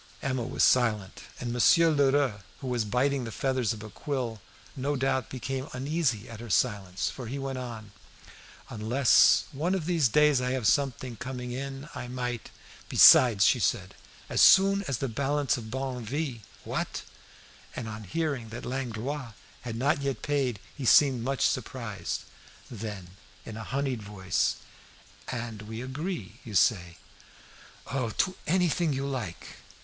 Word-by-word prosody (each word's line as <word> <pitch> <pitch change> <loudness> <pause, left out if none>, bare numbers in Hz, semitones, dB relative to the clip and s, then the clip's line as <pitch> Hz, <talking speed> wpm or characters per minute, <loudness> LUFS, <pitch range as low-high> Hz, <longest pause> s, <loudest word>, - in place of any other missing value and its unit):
Emma 130 -2 -1
was 115 - -1
silent, 110 -6 +2
and 120 -1 -3
Monsieur 165 +7 +5
Lheureux, 140 -6 +2 0.2
who - - -10
was 120 -3 -1
biting 130 +5 +1
the 115 - -5
feathers 130 -2 0
of 110 -2 -6
a 110 - -8
quill, 125 -5 -4 0.3
no 140 +2 -1
doubt 130 -2 0
became 130 +2 -4
uneasy 130 -4 -1
at 115 -2 -9
her 120 0 -8
silence, 100 -4 0
for 125 -3 -8
he 130 +5 -4
went 135 -1 -4
on 115 -4 -7 0.8
"Unless 115 +4 +4
one 165 +7 -1
of 175 -5 -3
these 165 -5 +3
days 150 -1 +4
I 125 0 -1
have 130 -4 -2
something 130 -1 +1
coming 125 +1 -5
in, 135 +2 -5
I 130 -3 -6
might 125 -2 -4 0.2
" - - -20
"Besides," 110 -6 +8 0.2
said - - 0
she, - - -22 0.3
"as - - +1
soon 195 +1 +7
as 135 -4 -1
the 135 - -2
balance 140 +4 0
of 120 - -6
Barneville 130 +1 -3 0.2
" - - -23
"What!" - - -3 0.7
And 120 - -5
on 110 -1 -7
hearing 140 - -2
that 115 +2 -7
Langlois 130 0 -4 0.3
had 115 -2 -5
not 140 +4 +1
yet 140 -1 -3
paid 135 -7 0 0.2
he 140 - -7
seemed 130 0 +5
much 135 +3 0
surprised. 115 -3 -4 0.5
Then 105 -5 -7 0.3
in 110 - -7
a 110 - -6
honied 135 -1 -2
voice 95 -3 -1 0.7
"And 115 -3 -5
we 110 +1 -7
agree, 155 +8 -5
you 110 -6 -8
say?" 90 -4 +2 0.9
"Oh! 130 -3 -2
to 185 - 0
anything 175 -2 +2
you 135 +1 -2
like." 125 -11 -5
130 Hz, 155 wpm, -28 LUFS, 115-140 Hz, 0.9 s, Besides